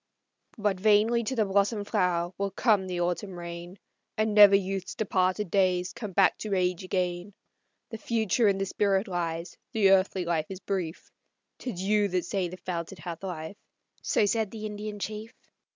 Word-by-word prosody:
"But 205 -3 0
vainly 215 +3 +4
to 260 - -2
the 220 -3 +2
blossomed 205 +1 +1
flower 175 0 0
will 200 0 0
come 195 -1 +2
the 180 -1 -2
autumn 180 +2 -2
rain, 170 +2 -8 0.4
And 215 0 +1
never 205 -1 +9
youth's 195 -1 -2
departed 185 -2 0
days 185 -2 +2
come 220 -4 -6
back 190 0 +3
to 210 -2 -2
age 180 -1 0
again; 180 +1 -2 0.6
The 225 - -6
future 225 0 +1
in 195 -1 +3
the 195 - -1
spirit 195 +1 +1
lies, 170 -1 -3 0.2
the 205 -4 +4
earthly 190 -1 +3
life 165 -2 0
is 190 -1 -6
brief, 185 -5 -4 0.5
'Tis 200 -8 -5
you 205 +1 +2
that 180 -2 -1
say 190 -3 -1
the 180 +2 -8
fount 170 -2 -4
hath 165 0 -7
life," 175 0 -6 0.4
so - - +2
said 220 0 0
the 215 0 -7
Indian 210 0 -5
chief. 215 +2 -6
195 Hz, 170 wpm, -28 LUFS, 180-210 Hz, 0.6 s, never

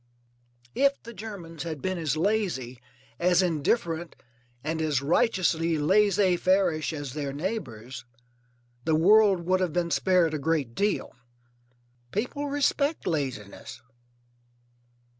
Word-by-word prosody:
If 280 0 +2
the 235 - -9
Germans 190 -8 -8
had 160 -2 -4
been 185 +3 -2
as 155 -3 -1
lazy, 165 - -1 0.4
as 180 +1 +3
indifferent, 170 0 -1 0.5
and 160 +2 -2
as 150 -4 +1
righteously 165 - +1
laissez 190 +3 +3
fairish 180 -4 +1
as 145 -5 -6
their 145 -2 -3
neighbours, 135 - -5 0.8
the 160 - +2
world 200 +2 +5
would 185 +1 +2
have 180 -4 -1
been 170 0 0
spared 180 -4 +3
a 155 - -2
great 145 -5 -1
deal. 205 - -1 1.0
People 270 +7 -2
respect 285 +1 0
laziness. 130 - -4
170 Hz, 115 wpm, -27 LUFS, 155-200 Hz, 1.0 s, world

